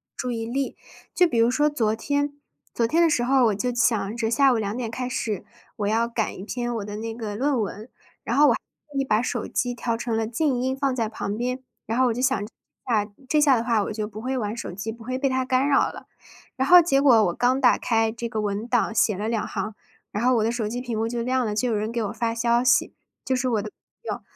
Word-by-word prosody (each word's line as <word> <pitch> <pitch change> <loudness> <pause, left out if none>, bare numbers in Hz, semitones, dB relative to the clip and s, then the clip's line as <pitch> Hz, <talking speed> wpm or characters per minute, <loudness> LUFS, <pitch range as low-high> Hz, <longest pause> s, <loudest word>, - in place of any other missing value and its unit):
注 255 - -3
意 225 -2 -3
力。 265 +4 -3 0.4
就 360 - +5
比 240 -8 0
如 230 +1 +5
说 295 +4 +2
昨 225 -8 0
天 285 +4 -1 0.4
昨 235 - +2
天 325 +8 +2
的 335 - +5
时 245 -6 +1
候， 260 +1 +3
我 215 -3 +2
就 245 +5 -1
想 225 -3 +1
着 230 -2 -1
下 265 +3 +4
午 - - +1
2 210 0 -2
点 235 -3 -3
开 250 +2 -3
始， 215 -5 -2 0.3
我 205 - -1
要 225 +2 +2
赶 230 -2 -2
一 185 - -7
篇 240 +2 -3
我 215 -3 -3
的 205 0 -6
那 225 +1 -4
个 220 -3 -5
论 270 +3 +1
文， 215 +2 -4 0.3
然 235 - -1
后 295 - +7
我 - - +5
还 - - -1
特 290 -2 -9
意 - - +2
把 220 -4 +2
手 245 -2 -3
机 245 0 -1
调 235 -1 -2
成 235 -1 -2
了 220 0 0
静 250 +1 0
音 260 +1 -1
放 270 -1 0
在 225 -3 -1
旁 205 -2 -4
边， 250 +2 -2 0.2
然 225 +2 -2
后 260 - +5
我 235 - +1
就 245 - -3
想 265 -2 +2
着 - - -9
这 235 +2 -8
下 210 -2 +2 0.2
这 300 +2 +3
下 285 -3 +5
的 230 - 0
话， 230 -3 +2
我 - - -4
就 215 -1 -3
不 215 0 -9
会 260 +2 -2
玩 215 -2 -2
手 235 - -5
机， 200 +5 -5
不 230 +1 -11
会 255 +2 -3
被 275 +1 +1
它 260 0 0
干 255 +2 +1
扰 280 -1 +4
了。 - - -11 0.5
然 265 +1 0
后 355 +2 +9
结 275 -5 +2
果 235 -6 +6
我 175 - 0
刚 250 +5 +2
打 250 -3 +5
开 225 -1 +1
这 235 +1 -5
个 220 -1 -2
文 205 +2 -2
档 240 -2 +1
写 210 -3 +3
了 210 +2 -3
两 225 -2 -1
行， 215 +1 -4 0.4
然 210 - -2
后 255 +1 +4
我 225 - +2
的 225 - +1
手 235 -3 -2
机 235 +3 -3
屏 240 -3 -4
幕 225 +1 0
就 235 0 -3
亮 255 +1 +1
了， 210 - -2
就 245 +4 0
有 225 - +1
人 215 +2 -2
给 235 0 -2
我 205 - -3
发 230 -1 -1
消 235 +1 +2
息， 255 - +3 0.3
就 260 - +1
是 255 0 0
我 220 -4 +1
的 215 - -6
朋 465 - -8
友 - - -12
235 Hz, 295 characters per minute, -24 LUFS, 220-255 Hz, 0.5 s, 后